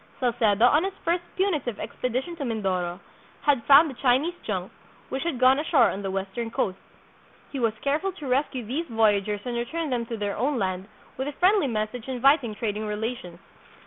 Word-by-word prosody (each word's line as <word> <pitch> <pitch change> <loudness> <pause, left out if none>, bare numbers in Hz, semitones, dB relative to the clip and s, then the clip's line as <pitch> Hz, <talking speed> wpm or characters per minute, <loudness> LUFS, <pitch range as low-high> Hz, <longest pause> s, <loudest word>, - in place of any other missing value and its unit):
Salcedo, 235 -4 +3
on 300 +6 +4
his 390 0 -3
first 340 +1 +1
punitive 310 - -1
expedition 255 +7 -3
to 295 - -4
Mindoro, 190 -7 -2 0.4
had 280 -6 +2
found 290 +2 +7
a - - -8
Chinese 265 +7 +2
junk, - - -3 0.4
which 265 - -3
had 330 -5 -2
gone 260 +2 +5
ashore 310 0 +4
on 195 - -5
the 195 - -3
western 195 +4 -3
coast. 195 -4 -2 0.7
He 275 - -4
was 230 -3 +1
careful 305 +8 0
to 305 -5 -9
rescue 260 -2 0
these 295 +10 -3
voyagers 210 -3 +1
and 245 -1 -3
return 295 +6 -3
them 235 -2 -1
to 230 - -4
their 205 -1 -2
own 270 +4 0
land, 190 -2 -2 0.3
with 265 +2 -2
a 290 - -4
friendly 370 +1 +3
message 220 +1 -3
inviting 260 -2 +2
trading 215 -1 -3
rela 220 +4 -2
tions. 175 -4 -11
245 Hz, 185 wpm, -26 LUFS, 215-285 Hz, 0.7 s, found